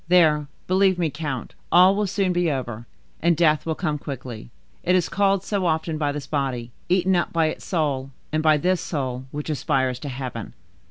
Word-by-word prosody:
There, 155 -4 +4 0.2
believe 190 0 +3
me, 165 -4 0
count, 140 -5 -4 0.2
all 185 +3 +7
will 210 0 0
soon 190 -1 0
be 175 -1 +2
over, 120 -4 -4 0.3
and 170 -1 +3
death 155 -2 +3
will 160 - 0
come 155 -4 -2
quickly; 125 - -7 0.3
it 180 - +2
is 180 -3 +2
called 195 -1 +2
so 195 -3 0
often 160 -1 -1
by 145 -2 +1
this 145 -1 -5
body, 130 -5 -2 0.2
eaten 185 +1 +3
up 175 - 0
by 165 -1 +2
its - - -7
soul, 145 -6 -1 0.2
and 155 0 +1
by 155 -1 +5
this 180 +4 +1
soul, 130 -4 -3
which 150 +3 -4
aspires 130 -2 0
to 145 - -5
heaven." 125 -4 -6
155 Hz, 195 wpm, -24 LUFS, 135-180 Hz, 0.3 s, all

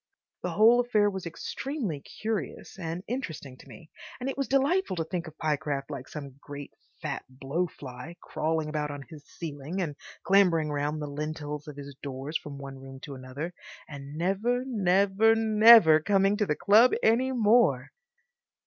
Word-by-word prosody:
The - - -3
whole 230 +3 +6
affair 215 -4 +2
was 190 -3 -5
extremely 215 - -4
curious 215 0 -5
and 170 +1 -4
interesting 160 - -5
to - - -16
me, 165 -3 -14 0.3
and 255 +2 -3
it - - -8
was 275 -1 -2
delightful 275 - +2
to 165 - -1
think 170 +1 -4
of 160 0 -12
Pyecraft 145 -2 -2
like 135 -2 -6
some 140 -3 -8
great, 145 -1 -9 0.3
fat - - -3
blow 135 +7 -2
fly, 135 +2 -10
crawling 160 0 -2
about 150 -1 -2
on 145 -1 -6
his 150 0 -13
ceiling 155 +2 -6
and 160 -6 -2 0.3
clambering 175 -6 +4
round 150 +1 -2
the - - -4
lintels 150 0 -5
of 150 - -8
his 140 0 -8
doors 140 +2 -6
from 145 -3 -4
one 135 -1 -8
room 135 0 -10
to 145 - -8
another, 135 +6 -6 0.3
and 140 0 -9
never, 200 +9 0
never, 200 -1 +3
never 220 -7 +7
coming 195 +3 +2
to 210 -1 0
the 150 - +1
club 220 +9 +5
any 245 +4 +3
more.... 235 -1 +3
165 Hz, 165 wpm, -28 LUFS, 145-210 Hz, 0.3 s, never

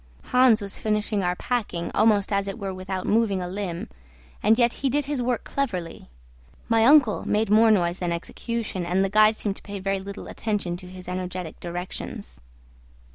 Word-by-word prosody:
Hans 250 -4 +4
was 200 -1 -5
finishing 210 -1 0
our 180 -1 0
packing, 205 -7 -2
almost 210 -2 +3
as 200 0 +1
it 195 - -4
were 195 -3 -4
without 185 0 -4
moving 215 -3 +2
a 180 - -3
limb; 180 -2 -4 0.5
and 220 +2 +4
yet 240 -1 +3
he 270 - +2
did 290 +2 0
his 285 -2 -2
work 245 -1 -1
cleverly. 185 -12 -4 0.6
My 225 -1 +3
uncle 270 -6 +5
made 210 0 +1
more 220 +1 +6
noise 175 -4 +2
than 175 -1 -1
execution, 210 +3 -4
and 180 +3 +1
the - - -1
guide 215 +2 +5
seemed 205 -2 -3
to - - -13
pay 200 -1 -7
very 195 +1 -1
little 200 +1 -8
attention 205 -5 -2
to 180 - -11
his 180 0 -10
energetic 180 -2 -5
directions. 170 - -7
200 Hz, 185 wpm, -25 LUFS, 180-225 Hz, 0.6 s, more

